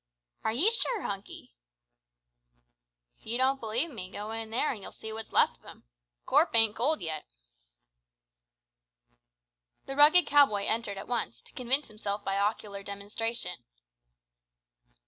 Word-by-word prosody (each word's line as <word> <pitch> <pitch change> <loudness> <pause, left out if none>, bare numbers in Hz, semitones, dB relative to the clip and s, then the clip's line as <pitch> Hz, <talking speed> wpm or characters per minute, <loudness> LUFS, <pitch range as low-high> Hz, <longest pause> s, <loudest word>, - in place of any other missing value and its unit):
"Are - - 0
ye 320 - +3
sure, 460 -3 +1
Hunky?" 195 - -6 1.7
"If - - -21
ye 235 +2 0
don't 265 +1 +2
believe 235 +8 -1
me, 185 -7 -7
go 210 +2 -6
in 225 0 -4
there 245 +7 +1
an' 220 - -7
you'll - - -9
see 220 0 -8
what's 220 0 -5
left - - +3
of - - -34
him. - - -14 0.4
The - - -50
corp - - +3
ain't 225 -2 +5
cold 295 +6 0
yet." 155 -2 -5 2.6
The 270 - -6
rugged 300 +5 +7
cow 285 -1 +6
boy 200 -1 -3
entered 220 -3 -1
at 195 - -8
once, 220 - -3
to - - -14
convince 260 +3 +1
himself 210 -1 -4
by 195 0 -1
ocular 200 -1 -2
demonstration. 200 0 -3
225 Hz, 145 wpm, -29 LUFS, 200-260 Hz, 2.6 s, rugged